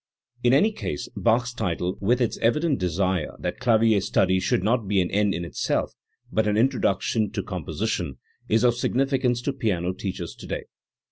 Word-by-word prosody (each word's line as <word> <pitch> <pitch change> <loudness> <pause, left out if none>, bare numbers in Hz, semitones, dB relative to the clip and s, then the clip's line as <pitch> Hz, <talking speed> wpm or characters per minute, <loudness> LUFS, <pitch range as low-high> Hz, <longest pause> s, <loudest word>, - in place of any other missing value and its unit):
In 120 - +4
any 175 +12 +4
case 75 - -4
Bach's 120 +1 +1
title, 90 -5 -2
with 120 +6 +2
its 120 - 0
evident 150 +5 +2
desire 90 -1 -1
that - - -4
clavier 115 -3 +3
study 95 -1 +2
should 95 0 0
not 115 0 +1
be 100 0 +2
an 90 - 0
end 105 0 +2
in 85 - -3
itself 85 - -1 0.4
but 110 -1 +1
an 105 0 +1
introduction 110 -3 +1
to - - -2
com - - -5
position, 65 -2 -2 0.3
is 110 +2 +3
of 120 -1 +5
significance 125 0 0
to 140 - -1
piano 95 -8 -1
teachers 95 0 -5
today. - - -6
110 Hz, 175 wpm, -25 LUFS, 95-125 Hz, 0.4 s, of